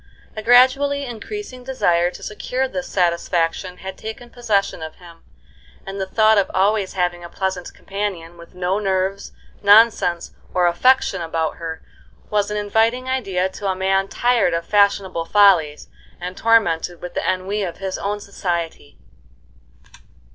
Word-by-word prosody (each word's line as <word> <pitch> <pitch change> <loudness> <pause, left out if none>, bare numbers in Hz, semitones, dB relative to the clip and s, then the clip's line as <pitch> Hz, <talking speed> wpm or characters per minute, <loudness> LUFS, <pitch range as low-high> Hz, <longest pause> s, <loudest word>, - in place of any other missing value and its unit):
A 215 - -4
gradually 260 +4 +4
increasing 255 - -7
desire 175 -10 +1
to - - -12
secure 250 +5 -2
this 270 +1 -5
satisfaction 175 0 0
had 190 0 -8
taken 230 +2 -8
possession 215 -8 -1
of 160 0 -7
him, 170 -2 -16 0.6
and 195 0 -5
the 190 - -2
thought 215 +1 +4
of 195 - 0
always 195 +1 +1
having 175 -2 -1
a 170 - -8
pleasant 190 -2 -3
companion, 195 -4 -5
with 170 +1 -15
no 180 +2 -1
nerves, 190 -1 -1 0.3
nonsense, 205 -4 +4 0.2
or 180 -1 +4
affectation 195 +1 +2
about 165 -1 -2
her, 160 -1 -6 0.5
was 205 -1 +1
an 210 - -2
inviting 225 +5 +1
idea 195 -8 0
to 200 +1 -6
a 190 - 0
man 195 +1 +1
tired 240 -6 +1
of 170 0 -3
fashionable 200 -4 +2
follies 175 -7 +4 0.3
and 180 +1 -6
tormented 180 -7 +2
with 180 - -8
the - - -2
ennui 190 +3 -3
of 175 -4 -4
his 190 0 -4
own 205 +1 -2
society. 170 -7 -4
195 Hz, 145 wpm, -21 LUFS, 175-220 Hz, 0.6 s, gradually